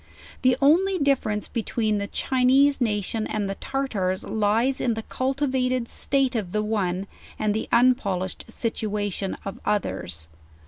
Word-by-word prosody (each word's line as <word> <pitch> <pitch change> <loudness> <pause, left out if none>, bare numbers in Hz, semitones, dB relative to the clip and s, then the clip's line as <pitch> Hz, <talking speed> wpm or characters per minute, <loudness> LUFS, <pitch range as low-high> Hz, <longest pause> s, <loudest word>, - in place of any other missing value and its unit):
The 255 -1 +4
only 370 +7 +4
differ 280 -7 +2
ence 210 0 -1
between 220 -2 -1
the 200 - -3
Chinese 265 +4 +3
nation 215 -1 0
and 210 -2 -2
the 195 - -2
Tartars 195 -7 -2
lies 220 +5 +1
in 235 -3 +1
the 225 - -4
cultivated 255 -2 0
state 270 0 0
of 200 -5 -2
the 210 0 +1
one, 195 -3 -1 0.3
and 210 -1 +1
the 220 - -3
unpolished 200 -7 +2
situation 205 -4 -2
of 195 - -5
others. 95 - -2
220 Hz, 140 wpm, -25 LUFS, 205-255 Hz, 0.3 s, The